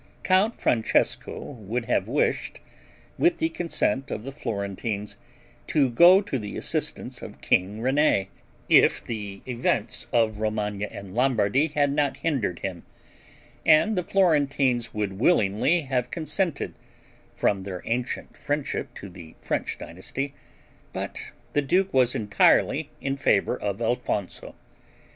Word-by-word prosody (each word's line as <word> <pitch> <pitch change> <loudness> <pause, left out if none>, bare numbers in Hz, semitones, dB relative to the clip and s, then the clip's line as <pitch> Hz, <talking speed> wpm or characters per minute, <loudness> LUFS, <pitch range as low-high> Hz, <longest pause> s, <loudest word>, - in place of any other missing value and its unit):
Count 195 +5 +2
Francesco 115 -2 +1
would 115 -1 -5
have 105 -5 0
wished, 140 +6 0 0.6
with 345 0 +3
the 325 - 0
consent 135 - -1
of 105 - -4
the 135 - -6
Florentines, 105 -4 -4 0.5
to 140 -5 +2
go 175 +9 +7
to 140 -10 -3
the 105 -2 -6
assistance - - -3
of - - -9
king 100 +4 +1
René, 130 -5 +3 0.4
if - - +5
the 105 -4 -6
events 125 -1 -1
of 110 -3 +2
Romagna 105 -1 -2
and 100 -2 -9
Lombardy 125 +2 +2
had 145 -2 +1
not 145 -1 0
hindered 130 - -1
him; 95 -3 -4 0.8
and 165 +8 +5
the 180 - +1
Florentines 140 -10 +2
would 100 -2 -3
willingly 115 - +3
have 130 -4 -1
consented, 165 -1 -2 0.6
from 100 -2 +1
their 95 -2 -6
ancient 120 +2 -3
friendship 145 -1 -3
to 100 - -8
the 85 -3 -12
French - - -2
dynasty, 135 +11 -5 0.6
but - - -5 0.2
the 145 - +3
duke 185 +7 +1
was 125 -2 +3
entirely 105 -2 +3
in 135 0 -1
favor 135 -8 +2
of 100 -1 -3
Alfonso. 115 -4 -2
125 Hz, 130 wpm, -25 LUFS, 105-145 Hz, 0.8 s, go